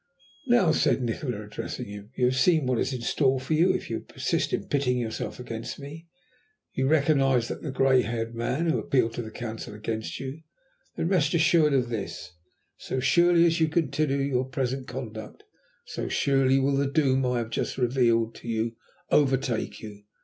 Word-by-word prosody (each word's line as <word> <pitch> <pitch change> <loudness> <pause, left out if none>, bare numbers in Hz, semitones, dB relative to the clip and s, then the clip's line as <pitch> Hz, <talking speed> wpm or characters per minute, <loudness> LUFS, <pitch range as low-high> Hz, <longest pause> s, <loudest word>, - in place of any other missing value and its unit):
"Now," 240 -9 +4
said 135 -4 +2
Nikola, 120 -2 -3
addressing 105 0 -6
him, 100 0 -9
"you 125 - +2
have 125 +1 +2
seen 155 +2 +3
what 125 -2 +1
is - - 0
in 125 -2 -4
store 130 +2 +1
for 135 +5 -3
you 170 +4 +4
if - - -3
you - - -3
persist - - -2
in - - -1
pitting 135 -3 +1
yourself 115 0 -4
against 115 -1 -6
me. 150 +4 -10 0.7
You 130 0 0
recognized 135 -5 +3
that 155 - -5
grey 130 -1 +4
haired 115 -1 -3
man, 125 +7 -1
who 165 - +2
had - - -4
appealed 120 -4 +2
to 120 - -4
the 110 - -7
Council 110 -2 -7
against 110 +1 -4
you. 135 +4 -6 0.5
Then, 165 - -1
rest 170 -4 +2
assured 165 -2 +4
of 125 -3 +1
this! 110 -5 -5 0.5
So 130 - -4
surely 170 +5 +4
as 165 0 +2
you 160 - +3
continue 155 -3 0
your 135 -2 0
present 130 0 -3
conduct, 110 -4 -7 0.4
so - - -5
surely 135 -1 +2
will 135 +1 +2
the 140 0 +1
doom 135 -3 +2
I 125 -1 0
have 115 -1 -3
just - - -2
revealed 120 -3 +2
to - - -12
you 115 0 -2 0.3
overtake 135 -5 +1
you. 105 -2 -10
130 Hz, 185 wpm, -26 LUFS, 115-145 Hz, 0.7 s, Now